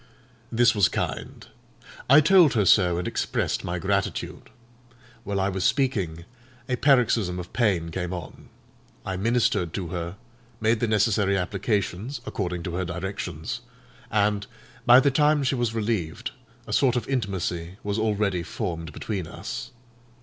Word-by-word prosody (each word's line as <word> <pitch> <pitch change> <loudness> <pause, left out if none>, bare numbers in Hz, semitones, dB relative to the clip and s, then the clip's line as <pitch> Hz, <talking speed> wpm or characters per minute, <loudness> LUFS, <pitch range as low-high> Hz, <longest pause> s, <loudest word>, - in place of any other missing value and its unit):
This 120 0 +4
was 100 -4 +4
kind. - - -4 0.6
I 140 +4 +8
told 175 -1 +6
her 105 -3 +3
so, 90 -2 +5
and 90 - -2
expressed - - -1
my - - -2
gratitude. - - -2 0.7
While 100 -2 -2
I 95 - +1
was 95 -1 -2
speaking, 95 - 0 0.4
a 125 - 0
paroxysm 120 -9 +3
of 90 0 -7
pain 95 -9 +1
came 90 +1 -3
on. 85 -4 -8 0.6
I 95 - -2
ministered 100 -4 +1
to 90 -4 -3
her; 85 0 -4 0.4
made 110 +1 +2
the 120 - +1
necessary 105 -2 +2
applications, 100 +5 -2
according 90 -3 -3
to 85 - -4
her 95 - -1
directions, 90 -2 -4 0.5
and, 105 -1 +1 0.4
by 120 +1 +9
the 140 +1 +3
time 150 +2 +3
she 135 - +1
was 120 -3 -1
relieved, 105 -8 -2 0.3
a - - -5
sort 130 -3 +3
of 120 -3 -2
intimacy 95 -8 -2
was 105 +1 -1
already 105 -4 0
formed 85 -1 -4
between 95 -7 -4
us. - - -6
100 Hz, 145 wpm, -25 LUFS, 90-120 Hz, 0.7 s, by